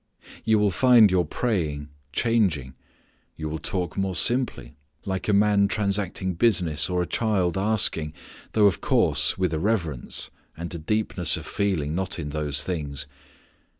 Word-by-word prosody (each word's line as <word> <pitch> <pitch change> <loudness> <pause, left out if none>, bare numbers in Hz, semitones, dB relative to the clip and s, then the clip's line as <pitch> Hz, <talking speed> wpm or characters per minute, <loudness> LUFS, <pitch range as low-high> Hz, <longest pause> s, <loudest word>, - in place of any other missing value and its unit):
You 110 -1 +3
will 105 -1 +2
find 120 0 +5
your 90 -2 +2
praying 75 -10 -2 0.2
changing. 90 - 0 0.6
You 80 - -4
will 80 +1 -4
talk 90 0 -3
more 95 -1 -1
simply, 125 - +1 0.3
like 95 -1 -3
a - - +2
man 100 0 +3
transacting 100 -3 -1
business 85 -7 +2
or 90 -1 0
a - - -2
child 95 -5 0
asking, 95 -6 0 0.4
though 105 -2 +4
of 100 -4 +2
course - - +2
with 90 -3 0
a 80 - -1
reverence 85 - -2 0.3
and 85 +2 -6
a 85 - -5
deepness 95 0 +2
of - - -8
feeling 85 -8 -1
not 95 +2 -2
in 75 -4 -5
those 75 -1 -1
things. 70 -6 -4
95 Hz, 150 wpm, -25 LUFS, 80-105 Hz, 0.6 s, find